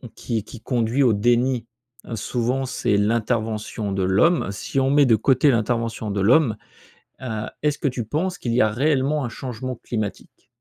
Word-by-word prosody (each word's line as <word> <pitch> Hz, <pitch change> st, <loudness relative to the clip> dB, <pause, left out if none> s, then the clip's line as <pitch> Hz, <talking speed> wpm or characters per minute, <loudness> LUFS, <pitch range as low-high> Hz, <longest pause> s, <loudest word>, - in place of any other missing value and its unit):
qui 115 Hz, -4 st, -3 dB
qui 110 Hz, -, -11 dB
conduit 120 Hz, +2 st, 0 dB
au 120 Hz, -4 st, +4 dB
déni 120 Hz, +2 st, +1 dB, 0.5 s
souvent, 125 Hz, +4 st, -1 dB
c'est 105 Hz, -5 st, 0 dB
l'intervention 110 Hz, -1 st, -1 dB
de 95 Hz, -1 st, -1 dB
l'homme, 100 Hz, -, +2 dB
si 100 Hz, +6 st, -3 dB
on 135 Hz, 0 st, +2 dB
met 145 Hz, +1 st, +5 dB
de 120 Hz, -3 st, +5 dB
côté 135 Hz, +6 st, +3 dB
l'intervention 115 Hz, -2 st, -1 dB
de 100 Hz, -, -2 dB
l'homme, 115 Hz, +3 st, +4 dB, 0.7 s
heu, 110 Hz, -4 st, -3 dB, 0.2 s
est-ce 150 Hz, -1 st, +1 dB
que -, -, -2 dB
tu 125 Hz, -3 st, -4 dB
penses 180 Hz, -, -2 dB
qu'il 120 Hz, -, -3 dB
y 125 Hz, -, +3 dB
a 110 Hz, -, +3 dB
réellement 140 Hz, +3 st, +1 dB
un -, -, -2 dB
changement 130 Hz, +1 st, -6 dB
climatique? 110 Hz, -3 st, -6 dB
120 Hz, 170 wpm, -22 LUFS, 110-135 Hz, 0.7 s, met